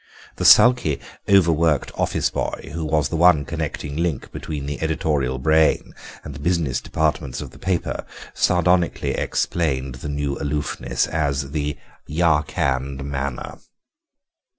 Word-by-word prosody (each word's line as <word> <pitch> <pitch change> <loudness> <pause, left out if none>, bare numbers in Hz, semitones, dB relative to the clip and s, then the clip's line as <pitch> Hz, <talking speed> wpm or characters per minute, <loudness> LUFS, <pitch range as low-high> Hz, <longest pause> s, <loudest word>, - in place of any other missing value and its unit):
The - - -2
sulky, 120 - +6 0.3
overworked 85 -5 +3
office - - 0
boy, - - -4
who 80 0 -3
was 75 -1 +1
the - - -3
one 80 -3 +5
connecting 70 0 -4
link 85 -5 -2
between 75 -3 -5
the 75 +1 -5
editorial 75 -5 0
brain 80 +3 +2 0.3
and 75 - -7
the 65 - -9
business 80 -4 0
departments 75 -4 -1
of - - -7
the - - -15
paper, 95 -3 -2 0.3
sardonically 90 -1 +2
explained 70 -6 -1
the 75 - -5
new 70 -1 -2
aloofness 70 -4 -1
as 70 -3 -1
the 75 -1 -2 0.3
'Yarkand 70 -4 0
manner. 70 -2 -4
75 Hz, 125 wpm, -22 LUFS, 70-80 Hz, 0.3 s, sulky